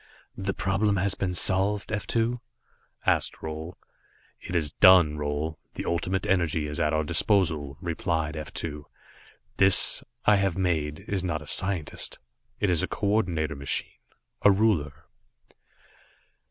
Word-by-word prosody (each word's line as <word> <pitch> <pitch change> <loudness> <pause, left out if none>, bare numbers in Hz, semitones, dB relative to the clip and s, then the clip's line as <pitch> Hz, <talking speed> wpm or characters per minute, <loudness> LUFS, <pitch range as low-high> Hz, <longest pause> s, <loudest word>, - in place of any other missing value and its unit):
"The 95 0 -3
problem 100 +2 +1
has 95 +1 +2
been 90 -2 -3
solved, 100 +3 0
F 105 -1 -3
2?" 115 +1 0 0.6
asked - - +1
Roal. 80 +2 -6 0.7
"It 90 - -6
is 75 -3 +1
done, 90 -4 +6
Roal. 75 +2 -3 0.2
The - - -5
Ultimate 90 +3 -1
Energy 85 -5 +1
is 75 0 -5
at 75 - +1
our 80 0 +1
disposal," 80 -4 0
replied 80 -2 -2
F 75 -1 -6
2. 75 -3 -6 0.7
"This, 95 -1 +5 0.2
I 105 -1 +5
have 95 -2 0
made, 80 -5 -1
is 95 -2 -1
not 80 -4 -2
a - - -13
scientist. 90 -1 -1 0.4
It 100 - +1
is 85 - +2
a - - -1
coordinator 90 -7 -1
machine 70 -1 -3 0.4
a - - +6
ruler." 85 -8 +1
85 Hz, 140 wpm, -26 LUFS, 75-95 Hz, 0.7 s, done